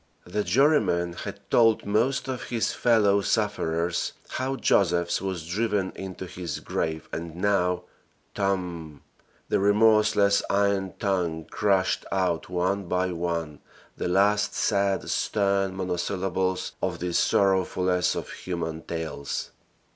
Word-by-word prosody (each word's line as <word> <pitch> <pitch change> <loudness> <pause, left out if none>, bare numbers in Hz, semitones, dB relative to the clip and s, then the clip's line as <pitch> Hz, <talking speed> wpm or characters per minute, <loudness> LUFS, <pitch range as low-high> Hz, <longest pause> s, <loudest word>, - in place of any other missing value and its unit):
The 105 +4 -2
jurymen 115 - +2
had - - -7
told 115 -2 +4
most 115 +8 +1
of 130 -2 -4
his 115 -2 -1
fellow 105 -4 +3
sufferers 85 -6 0 0.2
how 130 +1 -2
Josephs 85 -9 +2
was 95 -4 -4
driven 100 +1 -1
into 95 -1 -7
his 90 -1 -5
grave 80 -1 -3
and 85 0 -5
now 90 -2 +1 0.5
"TOMB!" 90 -7 -2 0.5
the - - +2
remorseless 105 0 +4
iron 100 -2 +1
tongue 90 -5 -1
crashed 95 -3 +1
out 90 -4 0
one 90 +2 0
by 90 +1 0
one 85 -3 -3 0.4
the - - -3
last 105 +3 +2
sad, 100 -2 +1
stern 100 -2 0
monosyllables 95 0 -1
of - - -1
this 90 -1 0
sorrowfulest 95 -2 +2
of - - -5
human 80 -3 -4
tales. 80 -4 -4
95 Hz, 115 wpm, -26 LUFS, 85-100 Hz, 0.5 s, told